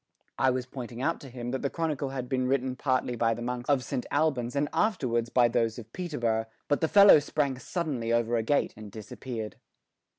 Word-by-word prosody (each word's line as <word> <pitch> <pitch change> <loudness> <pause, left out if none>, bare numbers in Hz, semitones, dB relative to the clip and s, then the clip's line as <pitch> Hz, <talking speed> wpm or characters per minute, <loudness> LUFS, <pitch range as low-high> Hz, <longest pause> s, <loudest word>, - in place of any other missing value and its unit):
I 135 - +4
was 130 -1 -1
pointing 125 -2 -8
out 165 +3 0
to 135 - -10
him 120 -1 -5
that 130 - -2
the 140 - 0
Chronicle 150 -4 -2
had 130 -2 -4
been 130 -1 0
written 130 -1 0
partly 130 -2 0
by 115 -1 +1
the 120 - -7
monks 125 +1 -4
of 140 -3 +3
Saint 125 - -3
Albans 145 -5 0
and 145 +1 +1
afterwards 120 - +1
by 120 -1 +4
those 115 -1 0
of 115 -1 -10
Peterborough, 120 -11 -1 0.2
but 145 - +1
the 160 - +3
fellow 200 -2 +8
sprang 145 -3 -1
suddenly 130 -6 -2
over 120 0 +2
a 115 - +2
gate 140 +6 +1
and 105 -1 -10
disappeared. 110 +1 -7
125 Hz, 205 wpm, -28 LUFS, 120-145 Hz, 0.2 s, fellow